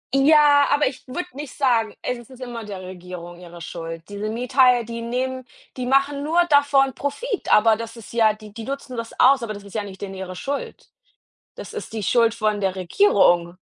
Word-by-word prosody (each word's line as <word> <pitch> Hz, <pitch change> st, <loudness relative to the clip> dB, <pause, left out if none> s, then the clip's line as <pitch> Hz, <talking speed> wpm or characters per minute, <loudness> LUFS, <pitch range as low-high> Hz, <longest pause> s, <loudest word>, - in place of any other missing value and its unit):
Ja, 290 Hz, 0 st, +6 dB
aber 290 Hz, +1 st, +3 dB
ich 260 Hz, 0 st, -7 dB
würde 315 Hz, +8 st, -4 dB
nicht 285 Hz, -1 st, -8 dB
sagen, 235 Hz, -6 st, +1 dB
es 240 Hz, -1 st, -4 dB
ist 260 Hz, -1 st, -14 dB
immer 240 Hz, -3 st, -6 dB
der 195 Hz, -3 st, -7 dB
Regierung 180 Hz, -1 st, -9 dB
ihre 175 Hz, -1 st, -12 dB
Schuld. 165 Hz, -1 st, -7 dB
Diese 205 Hz, +1 st, -4 dB
Miethaie, 250 Hz, 0 st, +3 dB
die 230 Hz, 0 st, -6 dB
nehmen 255 Hz, +2 st, -3 dB, 0.3 s
die 250 Hz, -1 st, -4 dB
machen 275 Hz, +1 st, +2 dB
nur 330 Hz, +3 st, +1 dB
davon 280 Hz, -2 st, +4 dB
Profit, 390 Hz, -, -3 dB
aber 220 Hz, +1 st, +6 dB
das 230 Hz, 0 st, -7 dB
ist 230 Hz, -, -12 dB
ja 220 Hz, -2 st, +4 dB
die 215 Hz, -1 st, -14 dB
die 225 Hz, 0 st, -7 dB
nutzen 275 Hz, -2 st, -6 dB
das 230 Hz, 0 st, -7 dB
aus, 265 Hz, 0 st, +6 dB
aber 220 Hz, -2 st, -4 dB
das 200 Hz, -, -10 dB
ist 200 Hz, -, -13 dB
ja 215 Hz, -2 st, -2 dB
nicht 195 Hz, -2 st, -10 dB
denen 195 Hz, -1 st, -5 dB
ihre 190 Hz, -1 st, -7 dB
Schuld. 280 Hz, +8 st, -5 dB, 0.6 s
Das -, -, -9 dB
ist -, -, -7 dB
die 220 Hz, -2 st, -4 dB
Schuld 230 Hz, +1 st, +3 dB
von 215 Hz, -2 st, 0 dB
der 190 Hz, -1 st, 0 dB
Regierung. 175 Hz, -, +3 dB
230 Hz, 200 wpm, -22 LUFS, 200-270 Hz, 0.6 s, Ja